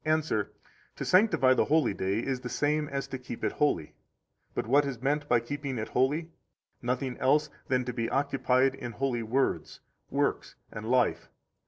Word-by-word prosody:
answer: 155 -9 0 0.4
To - - -5
sanctify 185 -9 +5
the - - +2
holy 150 -7 +2
day 95 +3 -1
is 135 -2 -1
the 125 -1 -6
same 150 +2 0
as 140 -1 -3
to 130 - -5
keep 125 -2 -8
it - - +1
holy. 85 - 0 0.6
But - - -1
what 140 +6 +4
is 135 -4 -4
meant 145 +2 0
by 120 -1 +4
keeping 140 +1 -4
it 110 - -4
holy? 150 +6 +1 0.5
Nothing 125 +1 -2
else 150 +3 +3 0.2
than 125 -1 +1
to 125 - -3
be 115 -1 -2
occupied 135 -1 +2
in 120 -3 -7
holy 125 0 -1
words, 125 +5 -1 0.3
works, - - -1 0.2
and 110 +1 -6
life. 125 -2 +2
130 Hz, 175 wpm, -29 LUFS, 120-145 Hz, 0.6 s, sanctify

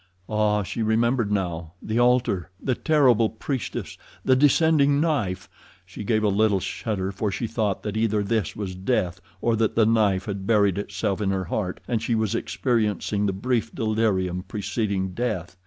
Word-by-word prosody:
Ah, 105 -1 +1
she 115 - -4
remembered 115 0 +1
now. 85 -5 -2
The 110 +5 -2
altar, 120 -9 +2
the 130 - 0
terrible 125 -7 +3
priestess, 125 +3 -5 0.3
the 130 - +5
descending 145 +1 +4
knife. 115 - 0 0.4
She 95 +3 -8
gave 110 +1 +1
a - - +3
little 100 0 +3
shudder, 95 0 -3
for 100 +1 -2
she 115 - -2
thought 110 -3 -1
that 105 -1 -4
either 110 -2 +1
this 105 -3 -1
was 100 -3 -4
death 95 -2 -1 0.2
or 115 -1 +2
that 110 -1 +1
the 115 - +4
knife 105 -4 +2
had 100 -2 -5
buried 100 -4 +3
itself 100 0 -2
in 100 - +1
her 95 -1 -1
heart 90 +1 -3
and 115 -3 0
she 115 0 0
was 110 -1 0
experiencing 105 -4 0
the - - +1
brief 115 +3 -1
delirium 105 -6 0
preceding 100 0 -2
death. 95 -6 -3
105 Hz, 170 wpm, -24 LUFS, 95-115 Hz, 0.4 s, the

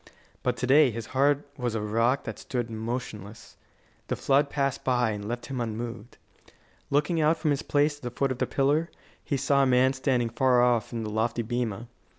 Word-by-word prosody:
But 125 -1 -1
to - - -1
day 140 +2 +6
his 115 -1 -5
heart 140 +2 +2
was 120 -2 -1
a - - 0
rock 115 +5 +1
that - - -6
stood 120 -2 -3
motionless. 110 -2 -6 0.5
The - - -1
flood 140 +1 +2
passed 140 -2 -1
by 125 -3 +2
and 105 -1 -5
left 120 +2 -4
him 130 -3 -4
unmoved. 115 +1 -5 0.7
Looking 150 +4 +1
out 155 +2 +3
from 155 -2 0
his 140 +1 0
place 145 -1 +1
at - - -22
the 125 - -4
foot 135 +2 -1
of 130 - -4
the - - 0
pillar, 145 +4 +1 0.3
he 140 - -1
saw 140 +1 +2
a 135 - +3
man 130 +1 +4
standing 130 -3 0
far 125 +1 +3
off 120 -3 +2
in 115 -2 -3
the 105 - -4
lofty 115 +2 0
bema. 120 -1 -3
125 Hz, 200 wpm, -27 LUFS, 115-140 Hz, 0.7 s, day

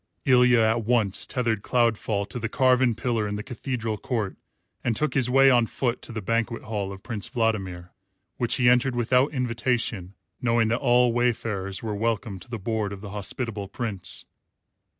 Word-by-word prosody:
Ilya 125 -2 +5
at 110 +1 +2
once 110 -4 +1
tethered 115 -5 -1
Cloudfall 110 -4 +1
to 120 - -5
the 115 -1 -3
carven 130 -1 +3
pillar 115 -2 -1
in 105 - -3
the 105 - -4
cathedral 115 -3 -4
court 110 -4 -2 0.5
and 120 - 0
took 155 +5 0
his 130 -3 +2
way 135 +1 +6
on 120 -2 +4
foot 125 0 -2
to - - -10
the 110 -2 -5
banquet 115 +2 -1
hall 105 -3 -3
of 95 0 -10
Prince 110 -3 -4
Vladimir, 95 -8 -2 0.5
which 120 -2 +1
he 125 -2 +2
entered 125 +1 +4
without 125 +3 +2
invitation, 120 -7 -1 0.3
knowing 115 -2 +2
that 115 +2 +1
all 125 -3 +4
wayfarers 110 -5 -1
were 110 -2 -2
welcome 110 -1 -2
to 90 - -15
the 120 - -4
board 110 0 -2
of 95 - -9
the 100 -2 -8
hospitable 105 +1 -3
Prince. 105 -3 -4
115 Hz, 175 wpm, -25 LUFS, 105-125 Hz, 0.5 s, way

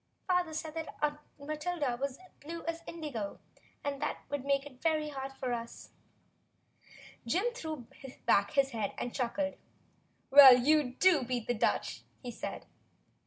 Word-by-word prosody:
"Father 360 -3 +1
said 320 0 -4
Aunt 295 0 +1 0.2
Matilda 300 -2 -2
was 275 -1 -2
as 370 0 -18
blue 330 +3 -7
as 335 0 -3
indigo, 285 -12 -5 0.4
and 280 0 -3
that 300 - 0
it - - -29
would 285 -2 -2
make 280 0 +1
it 260 -3 -13
very 310 -2 +1
hard 270 -1 -5
for 260 -2 -3
us." 235 0 -7 1.4
Jim 390 - +1
threw 315 - -6 0.4
back 200 0 +3
his 275 -2 +3
head 220 -4 -3
and 245 - -4
chuckled. 285 +3 -1 0.7
"Well, 270 -2 +11
you 275 0 +3
do 365 -4 +5
beat 245 -2 -2
the 245 - 0
Dutch," 225 - 0 0.2
he 245 - -5
said. - - -6
285 Hz, 155 wpm, -32 LUFS, 250-315 Hz, 1.4 s, Well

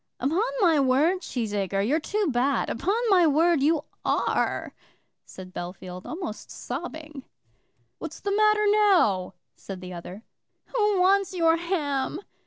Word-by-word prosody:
"Upon 305 +10 +1 0.2
my 330 -6 +4
word, 285 +8 +2
Cheesacre, 205 - -2
you're 300 +6 +2
too 415 +6 -1
bad; 260 +3 0
upon 375 - -1 0.2
my 360 -4 +5
word 320 +1 +3
you 305 +1 +2 0.2
are," - - 0 0.5
said 185 -1 -11
Bellfield, 180 +1 -7
almost 320 - -6
sobbing. 305 +1 -7 0.8
"What's 320 - -7
the 400 0 -2
matter 425 0 +3
now?" 365 - +3 0.2
said 195 -2 -8
the 180 0 -8
other. 180 +5 -9 0.5
"Who 420 -4 +2
wants 385 0 +3
your 330 -2 +4
ham?" 315 -4 -2
310 Hz, 130 wpm, -26 LUFS, 220-370 Hz, 0.8 s, my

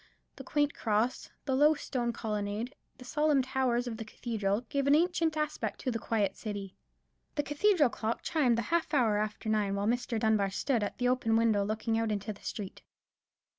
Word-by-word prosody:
The - - -9
quaint 295 -1 +1
cross, 220 +2 0 0.2
the 270 - 0
low 295 +4 +5
stone 245 -4 -2
colonnade, 210 +2 -3 0.2
the 250 - -12
solemn 295 0 +2
towers 255 -2 0
of 235 -2 -4
the 225 - -5
cathedral, 220 -2 -2
gave 275 +3 -2
an 285 - +6
ancient 330 -1 +2
aspect 305 0 -2
to 255 - -1
the 230 - -2
quiet 205 -4 0
city. 200 -3 -6 0.6
The 290 - +1
cathedral 295 0 +3
clock 225 0 -3
chimed 255 -8 +2
the 235 - 0
half 330 -2 +1
hour 220 -6 +3
after 215 +1 -3
nine 210 -2 +1
while 200 0 -1
Mr. 240 0 0
Dunbar 215 -3 +2
stood 235 +4 0
at 205 - -3
the 245 - +1
open 245 -3 +2
window 225 -3 +3
looking 220 +2 -1
out 225 -1 0
into 210 +1 -2
the 200 - -18
street. 200 -3 -6
235 Hz, 190 wpm, -31 LUFS, 215-275 Hz, 0.6 s, an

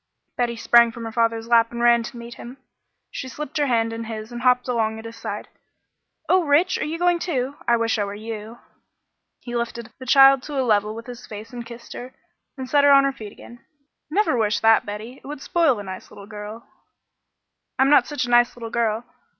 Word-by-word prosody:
Betty 240 -1 -1
sprang 235 +1 +5
from 235 0 -9
her 225 - -5
father's 230 0 0
lap 230 -1 +4
and 235 - -6
ran 235 0 +4
to 240 +2 -8
meet 235 0 -9
him. 245 +3 -11 0.5
She 260 - -6
slipped 300 +2 -5
her 290 - +2
hand 230 -2 +1
in 230 0 -5
his 220 0 -7
and 240 0 -6
hopped 250 0 +3
along 220 -3 0
at 220 - -10
his 230 0 -8
side. 230 - -6 0.8
"Oh, 370 -1 +4
Rich! 310 +5 +2
Are - - -1
you 315 +2 -3
going, 350 0 +2
too? 275 -6 -2
I 235 - +4
wish 230 -1 0
I - - +1
were 200 0 -5
you." 220 +1 -7 0.8
He 240 -1 -7
lifted 235 -1 -4
the 260 - -10
child 270 0 +7
to 285 0 -4
a 260 - +1
level 210 -1 +1
with 230 0 -8
his 245 -1 -10
face 215 +3 -9
and 240 -1 -6
kissed 235 0 -11
her, 250 +1 -9 0.4
then 260 - -5
set 285 +2 +3
her 285 - +6
on 275 0 +7
her 275 0 0
feet 215 -6 -9
again. 240 +5 -14 0.5
"Never 390 -3 +1
wish 210 -2 +1
that, 225 0 +4
Betty. 215 +5 -7
It - - -12
would 295 0 -6
spoil 315 -4 +2
a 205 - -6
nice 190 -1 -8
little 200 - -12
girl." 210 +2 -9 1.1
"I'm 270 +1 +3
not 290 - +5
such 295 -4 -2
a - - -7
nice 240 0 +4
little 230 -2 -8
girl. 230 -1 0
235 Hz, 225 wpm, -23 LUFS, 225-265 Hz, 1.1 s, child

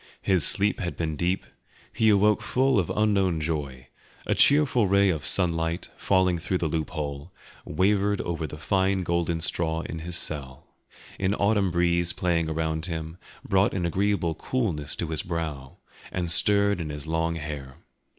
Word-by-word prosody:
His 95 -5 +2
sleep 100 +1 +2
had 85 -3 -4
been 80 -2 -2
deep; 90 +4 -1 0.5
he 110 - +3
awoke 105 0 +3
full 130 -2 +2
of 90 - -1
unknown 100 -5 +2
joy; 70 -5 -4 0.4
a - - +1
cheerful 140 -7 +4
ray 100 0 +4
of 80 -4 -4
sunlight, 85 -1 0
falling 95 -2 +1
through 90 +3 -1
the 85 - -1
loophole, 75 -1 -4 0.3
wavered 100 +4 +1
over 85 -2 -3
the 75 - -9
fine 95 +4 0
golden 85 -1 -1
straw 80 -1 -1
in 80 - -6
his 85 +2 -1
cell; 70 -6 -1 0.5
an 95 +1 +1
autumn 100 -2 +2
breeze 85 0 +1
playing 85 -3 0
around 80 +1 -2
him, 80 0 -6 0.3
brought 95 +1 +2
an 90 -3 -1
agreeable 95 -1 0
coolness 80 - -2
to 85 - -4
his 80 -2 -2
brow, 80 -6 -5 0.3
and 90 -2 -1
stirred 100 +1 +4
in 80 - -5
his 75 0 -6
long 80 +1 -1
hair. 75 -4 -7
85 Hz, 160 wpm, -26 LUFS, 80-95 Hz, 0.5 s, cheerful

